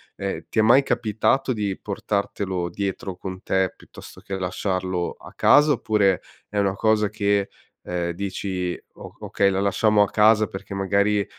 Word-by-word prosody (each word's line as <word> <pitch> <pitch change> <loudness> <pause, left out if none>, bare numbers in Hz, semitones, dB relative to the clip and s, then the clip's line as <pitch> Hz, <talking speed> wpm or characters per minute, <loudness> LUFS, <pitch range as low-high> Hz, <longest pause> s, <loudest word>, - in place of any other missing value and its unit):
ehm, 100 -1 -4
ti - - -1
è - - +7
mai 120 +5 +6
capitato 115 +3 +1
di 105 -4 -2
portartelo 100 -3 -3
dietro 95 0 -4
con 95 -1 -7
te, 95 -1 +1
piuttosto - - -14
che 95 0 -5
lasciarlo 95 -1 -2
a - - -13
casa, 150 +1 +5
oppure 105 -6 +1 0.3
è 105 - -5
una 100 -1 +1
cosa 110 0 +2
che, 100 -1 0 0.4
ehm, 85 -1 -2
dici: 95 -1 -3 0.2
"O - - -11
okay, 100 -1 +1
la 95 0 0
lasciamo 105 +1 +3
a 100 - -2
casa 110 0 +4
perché 95 +1 -8
magari, 100 +1 +1
100 Hz, 160 wpm, -23 LUFS, 95-105 Hz, 0.4 s, è